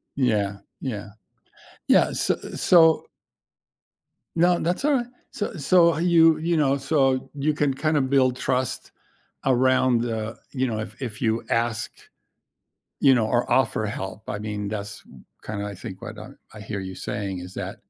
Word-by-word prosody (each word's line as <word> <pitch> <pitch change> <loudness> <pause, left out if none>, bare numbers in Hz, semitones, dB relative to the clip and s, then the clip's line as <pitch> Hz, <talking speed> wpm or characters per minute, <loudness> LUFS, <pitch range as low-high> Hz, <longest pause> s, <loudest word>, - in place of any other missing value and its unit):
Yeah, 105 -7 +1 0.2
yeah. 105 -6 -5 0.8
Yeah, - - +5
s - - +2 0.3
so 160 -3 +5 1.3
No, 175 +1 +3
that's 180 - -1
alright. 270 -5 +2 0.2
So 205 - -4
so, 170 +2 +4
you, 165 -2 +5
you 165 +1 0
know, 140 -2 +2
so, 135 -2 +1
you 150 +2 0
can 145 -2 +1
kinda 155 +1 +1
build 130 -1 +2
trust, 130 -1 -2 0.5
around 130 -2 +3
the 115 -1 -3
you 130 -2 -1
know 110 - -2
if 110 - -8
if 115 -4 -5
you 115 -1 0
ask, 115 -1 0 1.1
you 135 -2 +6
know, 115 -3 +2
or 120 +2 0
offer 130 -4 +2
help. 100 0 -5
I 105 - -3
mean, 105 -1 -4
that's 105 0 -5
w 65 - -17 0.2
kinda 105 -1 -4
I 100 - -6
think, 95 0 -9
what - - -8
I - - -9 0.3
I 105 - -10
hear 105 -1 -5
you 95 0 -6
saying, 95 0 -4
is 90 +1 -9
that, - - -5
130 Hz, 160 wpm, -24 LUFS, 105-150 Hz, 1.3 s, you